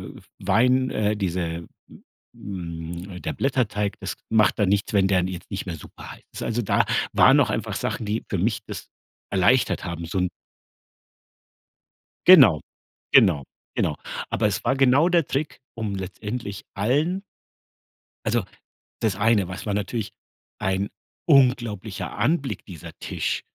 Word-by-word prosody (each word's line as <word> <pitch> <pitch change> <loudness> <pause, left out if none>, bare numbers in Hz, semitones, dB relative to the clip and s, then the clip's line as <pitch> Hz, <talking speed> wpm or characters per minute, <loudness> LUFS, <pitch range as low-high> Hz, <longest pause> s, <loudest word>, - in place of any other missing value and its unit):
W - - -12 0.2
Wein 125 +7 +3
äh, 105 0 0
diese 85 -3 -2 0.7
hm, 85 -1 -6
äh, - - -10
der - - -3
Blätterteig, 105 -7 -1
das - - -4 0.2
macht 110 0 +3
dann 100 -2 +3
nichts, 100 +1 0
wenn 95 -1 +4
der 95 -2 +2
jetzt 90 0 -7
nicht 95 - -4
mehr 85 -3 -4
super 75 - -11
heiß - - -16
ist. - - -5
Also 115 +1 -1
da 100 - +2 0.3
waren - - +6
auch - - +2
einfach - - -2
Sachen, 110 - -2
die 105 +2 -2
für 100 - -1
mich 105 +5 0
das - - -7 0.4
erleichtert 115 +7 +3
haben, 85 -1 -4
so 90 +3 -2
'n 90 -1 +1 2.0
Genau, 130 - +9 0.5
genau, 75 -7 +6 0.3
genau. - - 0 0.4
Aber 105 - +2
es 100 - -2
war 125 +3 +2
genau 135 +5 +4
der 170 -4 +2
Trick, 140 +1 -2 0.2
um 110 -3 -3
letztendlich 100 +2 -5
allen 150 - +1 1.0
Also, - - +1 0.6
das 105 -4 +1
eine, 105 -3 +3
weil 95 - -6
es - - -8
war 105 - -1
natürlich 105 +2 -2 0.5
ein 95 +1 0 0.4
unglaublicher 120 - +2
Anblick, 145 -3 0
dieser 85 -6 -9
Tisch, - - -2
105 Hz, 150 wpm, -24 LUFS, 95-125 Hz, 2.0 s, Genau